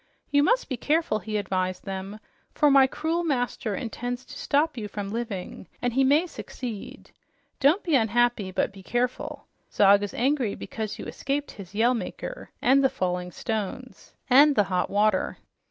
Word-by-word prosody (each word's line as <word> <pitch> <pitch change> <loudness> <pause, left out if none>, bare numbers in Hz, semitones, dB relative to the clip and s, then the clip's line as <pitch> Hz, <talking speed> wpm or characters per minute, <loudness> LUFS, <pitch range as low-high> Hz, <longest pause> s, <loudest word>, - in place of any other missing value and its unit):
"You 285 0 +5
must 485 +12 +2
be 255 - -3
careful," 300 -4 +1
he 215 +2 -3
advised 185 -2 -2
them, 195 +2 -5 0.4
"for 295 -2 +4
my 270 -1 +7
cruel 325 +5 -1
master 245 -8 -1
intends 245 +2 -4
to - - -11
stop 305 +3 +1
you 220 -4 -4
from 200 -1 -5
living, 215 -6 -5
and 245 -1 -1
he 270 +2 +3
may 290 +6 +4
succeed. 245 - -8 0.5
Don't 300 +9 +4
be 335 - -1
unhappy, 235 -4 +2
but 190 - -1
be 195 - -12
careful. 245 +5 -2 0.3
Zog 200 0 +5
is 205 -2 -4
angry 255 -4 +1
because 220 -2 -5
you - - -7
escaped 285 +1 -3
his 195 -1 -11
Yell 235 +4 +4
Maker - - -6
and 270 +3 +5
the 265 - +5
falling 180 -3 -2
stones 220 +6 -5
and 280 +3 +6
the 210 - +5
hot 180 - +1
water. 210 +1 +1
240 Hz, 170 wpm, -26 LUFS, 205-275 Hz, 0.5 s, my